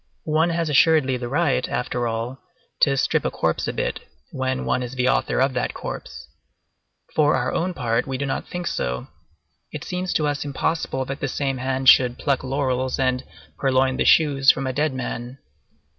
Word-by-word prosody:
One 160 +2 +2
has 165 -1 -1
assuredly 150 -3 +4
the 120 -1 -5
right, 145 -1 +1
after 120 -1 -2
all, 115 +3 -4 0.4
to 135 -2 +3
strip - - +1
a - - 0
corpse - - -1
a - - 0
bit - - -2 0.3
when 130 0 -2
one - - 0
is 125 +1 -5
the 125 0 +1
author - - +1
of 135 +1 +2
that 125 - -2
corpse. - - -7 0.9
For 150 -1 +3
our - - -1
own 180 +1 -1
part, 120 -4 0
we 135 -1 -2
do 140 - -2
not 135 - -3
think 180 0 -5
so; 60 - -3 0.6
it 150 +1 -6
seems 180 0 -3
to 155 - +1
us 145 -1 -1
impossible 140 -1 -2
that 135 +2 -5
the 135 - -1
same 135 -1 -2
hand 130 +1 -2
should 125 -1 +6
pluck 140 -2 0
laurels 130 -1 -1
and 130 -2 0 0.4
purloin 130 -1 +2
the - - +2
shoes 140 -3 +5
from 135 - +4
a 130 - -2
dead 150 +3 +1
man. 125 0 -5
135 Hz, 190 wpm, -23 LUFS, 130-150 Hz, 0.9 s, should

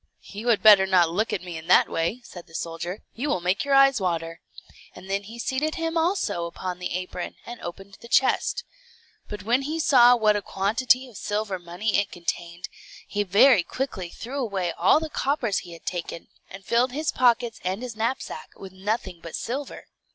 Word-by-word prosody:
"You 210 +4 -8
had 230 -3 +3
better 205 -3 +8
not 180 -3 +4
look 210 +6 0
at 180 - -2
me 175 -2 -6
in 160 - -13
that 180 - +6
way," 170 +10 -2
said 175 -6 -11
the 165 - -14
soldier; 170 +4 -5
"you 280 +6 -3
will 185 - +1
make 180 +3 0
your 280 -1 +2
eyes 275 -4 +5
water;" 165 -2 -2 0.5
and 190 - -12
then 200 0 0
he 220 +4 -11
seated 265 +6 -1
him 330 0 -2
also 325 - 0
upon 180 +1 -6
the 180 -1 -3
apron, 180 -1 -5
and 240 0 -9
opened 195 +3 -9
the 235 - -11
chest. 265 - +2 0.7
But 210 -2 -6
when 240 +5 +2
he 305 +4 -3
saw 245 -5 +6
what 215 -3 +3
a 205 - -1
quantity 230 +7 +1
of 235 -5 -13
silver 205 -2 -2
money 175 +5 -1
it 205 -1 -2
contained, 170 0 -5 0.4
he 205 - -1
very 205 +3 +5
quickly 190 -3 -4
threw 255 +10 -6
away 195 -8 -1
all 180 - +4
the 320 - -4
coppers 265 -8 -1
he 175 -2 -11
had 165 - -14
taken, 170 -2 -5 0.2
and 190 0 -11
filled 245 +3 +2
his 305 +3 -1
pockets 240 -2 +2
and 190 +6 -2
his 245 -3 -6
knapsack 225 -7 -3
with 190 - -10
nothing 190 -2 -3
but 165 - -7
silver. 270 +4 -5
205 Hz, 195 wpm, -25 LUFS, 180-250 Hz, 0.7 s, better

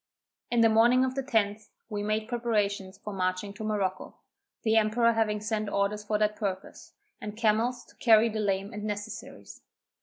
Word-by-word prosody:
In 240 -1 +2
the 225 - +7
morning 240 +4 +5
of 260 - -2
the 270 - -2
10th, 220 -5 0 0.2
we 210 -2 -4
made 215 +1 -1
preparations 205 -5 -1
for 210 +1 -7
marching 185 +1 -2
to 220 - -8
Morocco, 200 -3 -2 0.5
the 220 -1 +2
emperor 225 +2 +3
having 215 -2 0
sent 215 0 -2
orders 200 +1 -1
for 210 0 0
that 210 0 +1
purpose, 195 -3 -5 0.3
and 210 0 -6
camels 230 +2 +1
to - - -22
carry 225 -1 +5
the 220 -1 -3
lame 195 -1 -1
and 210 0 -6
necessaries. 210 +1 -7
215 Hz, 175 wpm, -28 LUFS, 205-225 Hz, 0.5 s, the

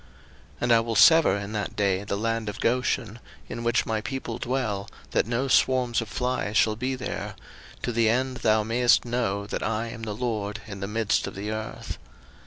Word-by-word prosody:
02:008:022 - - -26
And 120 - +2
I 115 - +7
will 115 0 -2
sever 160 - +7
in 100 0 -5
that 105 -2 -3
day 100 -2 +1
the 100 -1 -2
land 115 0 -1
of 105 - -7
Goshen, 120 -2 0 0.3
in 115 - -5
which 120 +1 +2
my 110 -1 -1
people 120 +1 -4
dwell, 120 -7 -2 0.2
that - - +1
no 120 +3 0
swarms 125 -3 +3
of 115 - -6
flies 125 -3 -1
shall 110 -1 +4
be 130 +4 -2
there; 130 - -5 0.5
to 120 - 0
the 115 -1 +3
end 130 +2 0
thou 110 -2 +3
mayest 120 +3 +3
know 115 -5 -1
that - - -4
I 115 +1 -1
am 115 - -8
the 110 -2 -4
LORD 110 -3 -3
in 100 -3 -8
the 100 - -3
midst 110 0 0
of - - -7
the 105 +2 -4
earth. 110 0 -5
115 Hz, 200 wpm, -26 LUFS, 105-120 Hz, 0.5 s, I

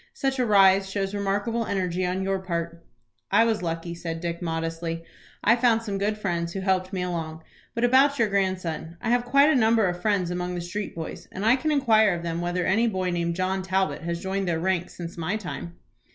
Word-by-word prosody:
Such 270 -1 -1
a 250 - +3
rise 195 -1 +5
shows 195 0 -2
remarkable 205 +3 -1
energy 185 -2 -1
on 185 +1 -1
your 195 0 0
part." 170 -2 -4 0.5
"I 225 - +5
was 225 -3 0
lucky," 165 0 -3
said 165 -1 -5
Dick, 170 0 -4
modestly. 165 0 -3 0.4
"I 230 - +5
found 235 -2 +2
some 200 -3 -3
good 210 +2 0
friends 170 -4 -2
who 195 - -3
helped 185 -1 0
me 185 -2 -2
along. 160 -3 -4 0.3
But 235 - -1
about 270 +3 +5
your 230 - +3
grandson: 185 -5 -2
I 225 - -1
have 245 0 +2
quite 280 +4 +5
a - - +3
number 225 -3 +4
of 175 -1 -2
friends 195 -4 +1
among 180 0 -3
the 175 - -3
street 185 +4 -5
boys, 165 -1 -7
and 195 +3 -4
I 230 +3 +6
can 290 +4 -2
inquire 220 -9 +4
of 170 - -6
them 170 0 -2
whether 175 0 -1
any 225 +5 +3
boy 185 -4 -1
named 170 -1 -1
John 185 +1 -1
Talbot 190 0 0
has 170 0 -3
joined 190 0 -2
their 165 -2 0
ranks 180 0 -1
since 170 -1 -7
my 180 +6 -1
time." 175 -4 -7
190 Hz, 215 wpm, -25 LUFS, 170-210 Hz, 0.5 s, I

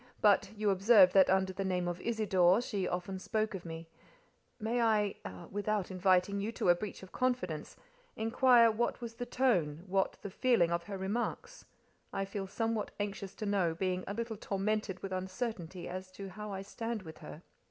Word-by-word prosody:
But 200 -1 +4
you 210 -1 +1
observed 195 -1 +6
that 190 -1 +6
under 190 0 +2
the 195 +1 -3
name 180 -2 0
of 175 0 -3
'Isidore' 195 -5 +3
she 200 -6 -2
often 180 +2 -3
spoke 215 +3 -1
of 185 -2 -6
me: 165 0 -7 0.7
may 235 +2 0
I—without 205 - -1
inviting 185 +1 +2
you 215 +3 -2
to - - 0
a - - +9
breach 195 +1 -6
of 190 - -12
confidence—inquire 245 - +1
what 235 +2 -1
was 235 -2 -6
the 245 +1 -6
tone, 175 - +1
what 195 0 0
the 200 - -5
feeling 235 -8 +3
of 170 0 -1
her 200 -1 -5
remarks? 240 - -3 0.5
I 195 0 -2
feel 195 0 -5
somewhat 225 +1 -1
anxious 200 -1 -4
to 215 - -5
know, 190 -5 +1
being 185 +1 -1
a 200 - -3
little 230 -1 -3
tormented 200 -1 -2
with 195 - -4
uncertainty 185 -1 -4
as 185 +1 -6
to 195 0 -7
how 210 +2 -7
I 195 0 -4
stand 225 +1 -4
with 160 -2 -10
her." 160 - -10
195 Hz, 175 wpm, -33 LUFS, 185-220 Hz, 0.7 s, a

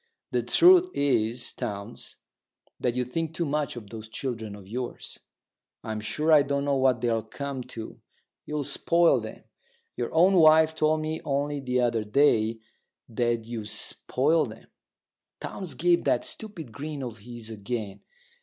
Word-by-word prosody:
The - - +1
truth 360 +1 +6
is, 120 -4 0
Townes, 100 -1 -6 0.6
that 125 -1 0
you 125 0 0
think 160 +5 -3
too 170 - 0
much 150 -2 -1
of 105 -4 -9
those 110 -1 -8
children 110 -4 -4
of 100 -2 -13
yours. 125 +4 -6 0.6
I'm 110 -1 -4
sure 150 +9 -1
I 150 - +8
don't 140 0 -1
know 140 -1 +2
what 130 -3 +3
they'll 115 -2 +1
come 135 +4 -5
to. 110 -1 -8 0.5
You'll 150 -1 -2
spoil 165 -4 +2
'em. 110 - -9 0.5
Your 120 - -3
own 175 +4 +5
wife 160 -1 +6
told 155 0 +1
me 155 +1 -3
only 145 +1 -1
the 125 -2 0
other 115 -2 +1
day 115 -1 +3 0.5
that 120 0 0
you 115 -1 -5
spoilt 140 +6 0
'em." - - -18 0.7
Townes 180 -8 -6
gave 175 +5 +3
that - - +2
stupid 175 - -6
grin 145 +3 -5
of 115 -3 -6
his 115 +1 -8
again. 105 -1 -5
125 Hz, 155 wpm, -27 LUFS, 115-155 Hz, 0.7 s, I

